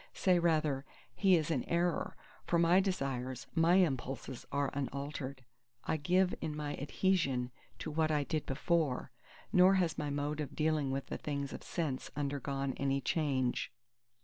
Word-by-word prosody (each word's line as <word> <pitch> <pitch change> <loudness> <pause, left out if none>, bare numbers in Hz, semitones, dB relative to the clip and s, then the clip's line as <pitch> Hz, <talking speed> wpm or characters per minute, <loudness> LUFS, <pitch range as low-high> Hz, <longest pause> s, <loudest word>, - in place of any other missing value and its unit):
Say 180 -2 +3
rather: 155 -5 +2 0.3
He 190 -2 +4
is 160 -1 0
in 135 -6 +1
error; 170 0 0 0.3
for 170 - +3
my 170 +2 +5
desires, 135 -10 -2
my 165 +1 +4
impulses 135 -7 0
are 140 -1 0
unaltered. 140 -1 -4 0.4
I 160 - 0
give 180 +5 +2
in 155 -2 -3
my 150 -1 -3
adhesion 140 -5 +1 0.3
to 155 - -5
what 155 +1 +1
I 150 -2 +2
did 150 +2 -2
before; 150 -2 0 0.4
nor 185 +1 +7
has 175 -4 +1
my 150 -1 -1
mode 145 +1 -2
of 150 - -4
dealing 155 -3 +1
with 135 0 -2
the - - -5
things 140 -2 -3
of - - -7
sense 150 -7 -3
undergone 140 -1 -2
any 140 0 +1
change. 135 -4 0
150 Hz, 155 wpm, -34 LUFS, 135-170 Hz, 0.4 s, nor